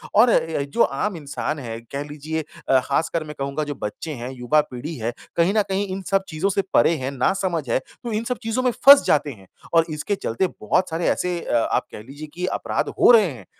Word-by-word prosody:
और 230 +4 +7
अ, - - +5 0.3
य - - -2
जो - - +5
आम 190 +9 -1
इंसान 150 0 -4
है, 115 -4 -6
कह 140 +1 -3
लीजिए 155 +2 -4 0.3
अ, 130 - +6
खासकर 160 +3 0
मैं 150 -1 -9
कहूँगा 140 +2 -2
जो 145 -1 -5
बच्चे 150 +9 -4
हैं, 125 -2 -6
युवा 130 +4 +2
पीढ़ी 140 +7 -6
है, 115 0 -2 0.3
कहीं 170 +3 +3
न - - +6
कहीं 195 +1 0
इन 190 0 -4
सब 195 0 +3
चीज़ों 175 +2 -1
से 195 0 +1
परे 170 - +4
हैं 130 0 -3
नासमझ 165 +3 0
है, 115 - +2
तो 235 - -10
इन 215 +1 -1
सब 250 +1 -2
चीज़ों 225 +3 -1
में 250 - +3
फँस 280 +4 +8
जाते 145 -1 +2
हैं 100 -6 -14 0.3
और 165 -1 +5
इसके 155 +6 -2
चलते 190 - -1
बहुत 180 - +1
सारे 165 +1 -1
ऐसे 180 -1 -1
अ, 120 - 0
आप - - +1
कह - - -8
लीजिए 145 +6 -9
कि 180 +2 -3
अपराध - - -2
हो - - +8
रहे 225 -3 +7
हैं, 115 -8 -11
155 Hz, 235 wpm, -22 LUFS, 135-190 Hz, 0.3 s, फँस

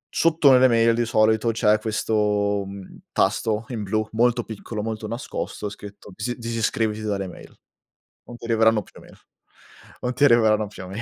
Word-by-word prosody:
Sotto 160 -4 +4
nelle 130 0 +6
mail 115 -1 +3
di 120 +1 0
solito 110 +1 +2
c'è 110 -1 +2
questo, 105 -2 0
mhmm, 100 -1 -10
tasto 110 +2 0
in 120 -4 -4
blu 110 +2 -1
molto 120 +1 +2
piccolo, 110 0 -6
molto 110 -1 -4
nascosto, 115 -2 -5
scritto 100 0 -12
disi 120 +5 -4
disiscriviti 115 -2 -2
dalle 100 -2 -2
mail. 90 - -13 0.7
Non 120 - -11
ti 120 - -11
arriveranno 110 -1 +3
più - - -17
mail, - - -17 0.8
non 125 0 -2
ti 125 - 0
arriveranno 110 -5 +4
più 95 -2 -10
mail. 95 +5 -6
110 Hz, 165 wpm, -23 LUFS, 105-115 Hz, 0.8 s, nelle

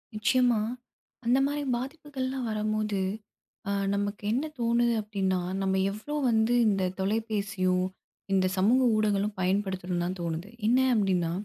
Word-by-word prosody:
நிச்சயமா 245 0 +3 0.6
அந்தமாரி 275 +4 +2
பாதிப்புகள்லாம் 265 -1 -4
வரும்போது, 215 -1 -1 0.7
ஆ - - +1 0.2
நமக்கு 205 +1 -2
என்ன 260 +7 0
தோணுது? 235 0 +2
அப்பிடின்னா, 195 -3 -1 0.2
நம்ம 190 0 +1 0.2
எவ்ளோ 220 +9 -6
வந்து 225 +1 +3
இந்த 195 -2 +2 0.2
தொலைபேசியோ! 200 -2 0 0.6
இந்த 190 -1 +3
சமூக 225 +8 +4
ஊடகங்களும் 210 -1 +1
பயன்படுத்தணுன்தான் 185 -2 -1
தோணுது. 170 +3 -3 0.2
என்ன 245 +3 +4
அப்பிடின்னா, 185 -6 +1
210 Hz, 110 wpm, -28 LUFS, 190-240 Hz, 0.7 s, சமூக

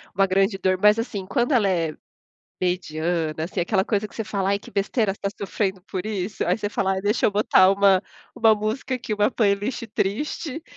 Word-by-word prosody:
uma 195 +1 +4
grande 195 +1 +1
dor, 185 0 0
mas 210 +1 +6
assim, 210 -5 -4
quando 240 +7 0
ela 225 -7 +3
é 165 -4 -1 0.7
mediana, 170 -2 -1
assim, 180 +2 -3
aquela 190 +2 +1
coisa 210 +1 -1
que - - -20
você 225 - -3
fala: 195 -2 -1
"Ai, 200 - +1
que - - -14
besteira 200 0 0
você - - -20
está - - 0 0.2
sofrendo 190 -2 -2
por 185 -2 -3
isso". 210 -1 -3
Aí - - +1
você 205 - -2
fala: 195 -2 -1
"Ai, 190 - -2
deixa 205 +3 0
eu - - +5
botar 200 -2 +4
uma 195 -1 +4 0.3
uma 225 -1 +5
música 215 +5 -3
aqui, 230 -3 -4
uma 210 +2 +2
playlist 210 +1 0
triste.". 295 - -2
200 Hz, 205 wpm, -23 LUFS, 190-215 Hz, 0.7 s, mas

